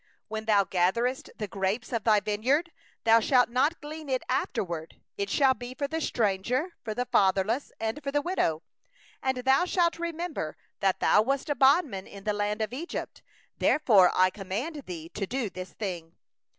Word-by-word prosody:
21When 220 0 -4
thou 205 -2 +5
gatherest 195 +9 0
the 210 - -3
grapes 200 +5 -2
of 230 -3 -1
thy 215 -2 +5
vineyard, 245 - 0 0.3
thou 225 0 +6
shalt 245 +2 +3
not 275 +7 +1
glean 305 0 -8
it 255 -1 0
after - - 0
thee; 165 -2 -6 0.2
it 200 0 -3
shall 265 +4 +4
be 250 0 -8
for 280 +2 -2
the 320 +2 -3
stranger, 240 - 0
for 215 -2 -4
the 250 - -1
fatherless, 200 +6 +2
and 225 +6 -2
for 280 -1 -3
the 290 0 +1
widow. 165 - 0 0.6
22And 260 -1 -1
thou 265 +5 +4
shalt 345 -2 +1
remember 335 - -4 0.2
that 190 -1 +1
thou 210 - +5
wast 275 +5 -1
a - - +1
bondman 270 - +3
in 200 -1 -11
the 210 0 0
land 210 +1 -1
of 215 - -4
Egypt; 325 +7 -5 0.4
therefore 210 -12 +5
I 185 0 +4
command 210 - -4
thee 165 -3 -6
to 195 +2 -4
do 245 -4 -2
this 185 0 -7
thing. 175 -5 -5
225 Hz, 180 wpm, -28 LUFS, 195-275 Hz, 0.6 s, thou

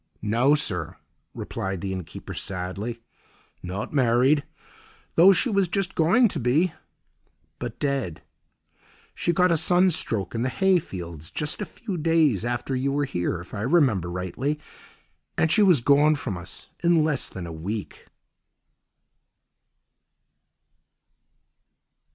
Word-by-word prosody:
"No, 120 +7 +3
sir," 90 - -1 0.4
replied 95 -1 -4
the 95 -1 -3
inn 95 -1 -4
keeper - - -9
sadly, 100 +5 -5 0.6
"not 95 +8 -5
married—though 140 +7 +2
she 195 - +2
was 200 -5 +2
just 195 +1 -1
going 190 +10 +4
to 165 - -3
be—but 120 - -4
dead. 135 - -2 0.9
She 175 - 0
got 180 +1 +3
a 165 - +3
sunstroke 160 - +2
in 115 - -2
the 130 - 0
hayfields, 95 - -1
just 150 +6 -2
a - - -1
few 205 -7 -6
days 155 - +2
after 120 +2 -2
you 135 +2 0
were 145 +1 0
here, 90 -9 -2
if 90 - -14
I 100 - -4
remember 125 - +2
rightly, 95 +12 -3 0.8
and 160 - +2
she 215 - +4
was 180 - +5
gone 145 +4 +4
from 125 -8 -4
us 85 -1 -8 0.2
in 170 -2 +4
less 150 -4 -1
than 95 -2 -7
a 85 - -7
week." 95 +6 -6
130 Hz, 125 wpm, -25 LUFS, -, 0.9 s, was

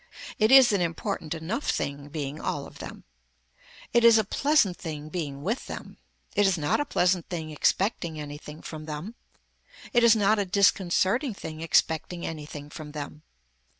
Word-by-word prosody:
It 215 +2 +4
is 265 -3 +9
an 200 - +2
important 170 -1 -2
enough 185 - -3
thing 140 +1 -2
being 145 -1 -5
all - - -2
of - - -13
them. - - -8 0.9
It 235 0 +4
is 230 -1 +8
a 220 - +3
pleasant 245 - +2
thing 155 -2 -6
being 145 -5 -4
with 225 +7 -2
them. - - -8 0.4
It 205 -1 +4
is 190 -2 +2
not 150 - +1
a 290 - 0
pleasant 180 - +1
thing 160 -3 -4
expecting 170 0 0
anything 150 +1 -8
from 155 -1 -7
them. 155 +8 -6 0.8
It 240 -1 +4
is 235 -1 +7
not 215 0 +3
a 200 - +1
disconcerting 200 +5 +2
thing 155 -4 -7
expecting 165 +1 +1
anything 150 -2 -7
from 155 -2 -9
them. 150 0 -7
170 Hz, 165 wpm, -27 LUFS, 155-205 Hz, 0.9 s, is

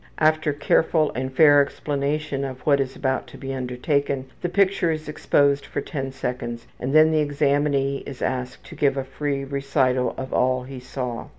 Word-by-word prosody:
After 155 -1 +2
careful 155 +2 +2
and 130 +1 -3
fair 145 +1 +6
explanation 145 0 -2
of 130 -2 -5
what 140 -2 +3
is 135 -1 -2
about 130 -1 -1
to - - -12
be 135 0 -5
undertaken, 130 +2 -1 0.2
the 175 - -1
picture 195 -2 +2
is 155 -1 -3
exposed 145 -2 +2
for - - -4
ten 135 -3 -4
seconds, 125 -2 -4
and 130 - -2
then 155 0 +7
the 155 - +2
examinee 140 -1 +1
is 135 -3 -7
asked 125 0 -3
to - - -11
give 140 -1 +1
a 135 - -1
free 135 +1 -3
recital 135 -2 0
of 130 0 -5
all 130 0 +2
he 130 0 -8
saw. 125 -1 -5
140 Hz, 180 wpm, -23 LUFS, 130-150 Hz, 0.2 s, then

